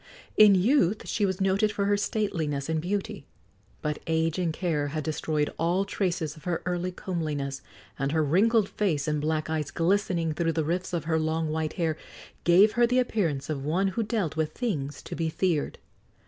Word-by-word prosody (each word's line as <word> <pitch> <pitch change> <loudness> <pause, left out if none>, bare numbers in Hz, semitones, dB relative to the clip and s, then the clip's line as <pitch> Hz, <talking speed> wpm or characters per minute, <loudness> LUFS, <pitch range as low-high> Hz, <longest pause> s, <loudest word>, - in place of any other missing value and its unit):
In 210 -2 +8
youth 205 - +2
she 205 -3 +1
was 190 0 -2
noted 195 +2 +2
for 200 -1 -1
her 205 0 +3
stateliness 165 -9 -1
and 160 -1 0
beauty; 185 -5 -3 0.6
but 150 -1 -2
age 160 +1 +1
and 175 -3 +1
care 155 -4 -1
had 155 +1 -3
destroyed 155 -1 -1
all 175 +4 +1
traces 175 -6 -2
of 155 - -16
her 175 -2 -2
early 180 0 -1
comeliness, 150 -7 -3 0.4
and 140 0 0
her 160 0 +2
wrinkled 205 +8 +3
face, 165 -10 -1
and 150 -1 0
black 155 0 -1
eyes 155 -3 -2
glistening 170 -2 +1
through 165 +1 0
the 160 -2 0
rifts 180 +4 -2
of 170 -4 -2
her 160 0 +1
long, 160 0 -1
white 155 0 -2
hair, 160 -4 -1 0.5
gave 190 +5 +6
her 240 +1 +3
the 250 +1 +1
appearance 190 - 0
of 145 -3 -3
one 180 +7 +1
who 210 +5 -2
dealt 210 -8 -1
with 155 -1 -1
things 150 - -3
to - - -6
be 165 -1 -1
feared. 165 -2 -1
165 Hz, 190 wpm, -27 LUFS, 155-195 Hz, 0.6 s, In